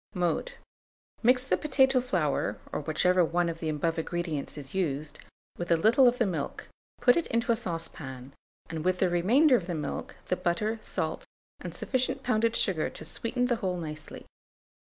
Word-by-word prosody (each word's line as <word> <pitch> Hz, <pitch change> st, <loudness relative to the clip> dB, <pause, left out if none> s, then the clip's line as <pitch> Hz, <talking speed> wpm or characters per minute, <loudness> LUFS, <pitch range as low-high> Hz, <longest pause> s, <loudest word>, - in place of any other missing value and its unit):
Mode. 180 Hz, -, 0 dB, 0.7 s
Mix 250 Hz, +2 st, +4 dB
the 265 Hz, -, +1 dB
potato 265 Hz, -3 st, +3 dB
flour, 180 Hz, -, 0 dB
or -, -, -2 dB
whichever 180 Hz, +4 st, +3 dB
one 170 Hz, +1 st, +1 dB
of 165 Hz, 0 st, -5 dB
the 160 Hz, -, -2 dB
above 160 Hz, +2 st, 0 dB
ingredients 160 Hz, -3 st, -3 dB
is 135 Hz, -2 st, -9 dB
used, 150 Hz, -5 st, -2 dB, 0.4 s
with 175 Hz, -, -3 dB
a 170 Hz, -, +6 dB
little 230 Hz, +9 st, +5 dB
of 245 Hz, 0 st, +3 dB
the 235 Hz, -, +2 dB
milk; 165 Hz, -7 st, -3 dB, 0.3 s
put 245 Hz, -, +5 dB
it 340 Hz, -, 0 dB
into 235 Hz, +1 st, +1 dB
a -, -, +4 dB
saucepan, 150 Hz, -, -5 dB, 0.4 s
with 180 Hz, +3 st, 0 dB
the 185 Hz, 0 st, +2 dB
remainder 250 Hz, -, +5 dB
of 180 Hz, -7 st, -1 dB
the 175 Hz, -, -2 dB
milk, 150 Hz, -, -4 dB
the 185 Hz, -, 0 dB
butter, 210 Hz, +6 st, -1 dB
salt, -, -, -3 dB, 0.3 s
and -, -, -7 dB
sufficient 255 Hz, -1 st, -1 dB
pounded 230 Hz, -1 st, +2 dB
sugar 170 Hz, -6 st, +1 dB
to 155 Hz, -, -9 dB
sweeten 240 Hz, +9 st, -1 dB
the 245 Hz, -2 st, +1 dB
whole 185 Hz, -4 st, -2 dB
nicely. 155 Hz, -2 st, -7 dB
180 Hz, 175 wpm, -29 LUFS, 160-235 Hz, 0.7 s, a